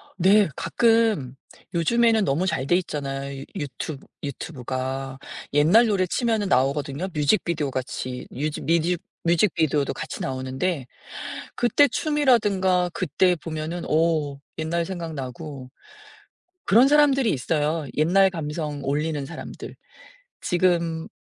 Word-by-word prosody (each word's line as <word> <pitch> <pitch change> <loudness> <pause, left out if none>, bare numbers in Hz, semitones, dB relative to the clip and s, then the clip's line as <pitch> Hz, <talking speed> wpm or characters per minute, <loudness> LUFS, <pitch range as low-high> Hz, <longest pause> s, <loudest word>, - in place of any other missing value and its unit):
네. 195 +2 +5
가끔 215 - +2 0.4
요즘에는 225 +6 +3
너무 150 +7 +1
잘 135 -6 -1
돼 175 - +4
있잖아요 140 -5 -4
유튜브 145 -2 -5 0.2
유튜브가. 135 -1 -4 0.3
옛날 165 +11 +5
노래 195 -4 +2
치면은 225 0 0
나오거든요. 140 +4 +1
뮤직비디오같이 145 -6 -1
뮤즈 150 +3 -3
뮤직 170 +1 +1 0.2
뮤직비디오도 165 -4 +2
같이 - - -6
나오는데 130 +4 -2 0.7
그때 245 +4 +4
춤이라든가 210 - +2
그때 180 +2 +2
보면은 160 +1 -5
어 155 -3 +1 0.2
옛날 165 +2 -1
생각나고. 150 -6 -6 1.0
그런 235 +6 +6
사람들이 275 -5 +4
있어요. 150 +3 -1
옛날 190 +5 +4
감성 150 -3 -4
올리는 145 +1 -1
사람들. 160 +2 -9 0.7
지금 170 -2 +1
160 Hz, 275 characters per minute, -24 LUFS, 140-185 Hz, 1.0 s, 그런